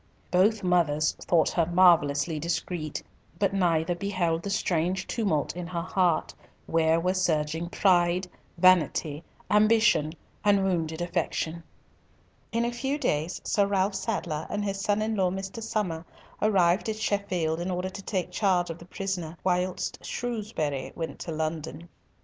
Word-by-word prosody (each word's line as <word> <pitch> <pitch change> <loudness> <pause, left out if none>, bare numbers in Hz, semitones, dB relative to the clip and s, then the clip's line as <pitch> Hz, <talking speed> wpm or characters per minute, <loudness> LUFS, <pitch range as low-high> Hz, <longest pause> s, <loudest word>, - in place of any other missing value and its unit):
Both 200 +4 +3
mothers 155 -4 +2
thought 165 -3 +2
her 170 -2 +1
marvellously 165 -4 +4
discreet; 165 -1 -3 0.3
but 195 +1 +1
neither 175 -3 +2
beheld 175 -3 -1
the 200 - -5
strange 185 -2 0
tumult 195 -12 -1
in 175 -1 -5
her 170 -1 -3
heart, 180 -2 +1 0.3
where 165 0 +2
were 180 +2 +1
surging 165 -2 0
pride, 180 -1 +2 0.3
vanity, 165 -4 +3 0.3
ambition, 210 -7 +4 0.3
and 200 -1 +4
wounded 170 -3 -1
affection. 170 -1 -2 0.9
In 230 +1 +1
a 240 - -1
few 270 +4 -1
days, 160 - -1
Sir 200 -1 +2
Ralf 195 0 +1
Sadler 190 -6 -3
and 205 0 -2
his 195 -1 -2
son 205 +2 +1
in 220 +1 -1
law 190 -3 +2
Mr. 195 +4 -5
Somer 210 -8 -2 0.4
arrived 190 -1 +3
at 220 - -1
Sheffield 190 -7 -1
in 175 +2 -3
order 185 +1 -2
to 195 - -8
take 185 -2 -3
the - - -21
charge 180 -4 +2
of 165 - -8
the 170 - -12
prisoner 180 -3 -4
whilst 180 0 -1
Shrewsbury 210 - -3
went 165 -2 -5
to 165 - -5
London. 160 +1 -4
180 Hz, 150 wpm, -27 LUFS, 165-195 Hz, 0.9 s, marvellously